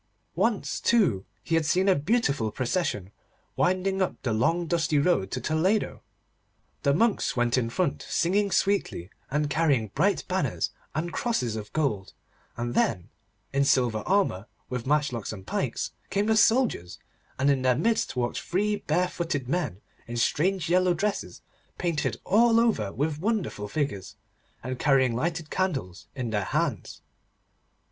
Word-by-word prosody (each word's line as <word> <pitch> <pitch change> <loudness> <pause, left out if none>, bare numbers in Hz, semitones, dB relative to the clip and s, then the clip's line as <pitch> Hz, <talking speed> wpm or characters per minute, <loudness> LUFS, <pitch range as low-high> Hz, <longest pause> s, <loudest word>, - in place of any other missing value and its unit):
Once, - - 0
too, 175 - +2 0.2
he 165 - -4
had 165 0 +3
seen 185 +5 +2
a 195 - +6
beautiful 145 - +1
procession 120 - -2 0.4
winding 185 +1 +1
up 185 - -1
the 120 -4 0
long 165 +11 +1
dusty 160 -2 +1
road 145 - +2
to 130 - -3
Toledo. 180 +10 0 0.8
The 140 - +3
monks 220 - +1
went 120 0 +2
in 120 -3 0
front 180 +8 -1
singing 200 +4 +2
sweetly, 195 - 0 0.2
and 150 +2 0
carrying 145 -8 +1
bright 185 - +1
banners 135 - -1 0.2
and 165 +2 -2
crosses 125 - -1
of 105 -1 -6
gold, 110 -11 -1 0.4
and 120 0 -3
then, 90 -8 0 0.4
in 140 0 +3
silver 125 -5 +2
armour, 185 - +1 0.2
with 125 -1 -3
matchlocks 145 -6 0
and 95 -3 -9
pikes, - - -2 0.2
came 200 +1 +1
the 220 0 +3
soldiers, 220 - +2 0.4
and 140 +2 +3
in 135 -2 +1
their 130 -1 +3
midst 230 -3 0
walked 120 -1 -1
three 205 +4 0
barefooted 170 -5 -1
men, 145 - -2 0.3
in 120 0 -5
strange 175 +8 +1
yellow 180 +1 +3
dresses 205 +4 -3 0.3
painted 170 -4 -1
all 230 +3 +4
over 215 - +1
with 145 +6 -2
wonderful 195 - -1
figures, 120 -6 -3 0.5
and 130 +1 -4
carrying 130 -4 +3
lighted 160 +3 -2
candles 135 - -2
in 125 -4 -3
their 105 -3 0
hands. - - -2
150 Hz, 145 wpm, -27 LUFS, 120-185 Hz, 0.8 s, a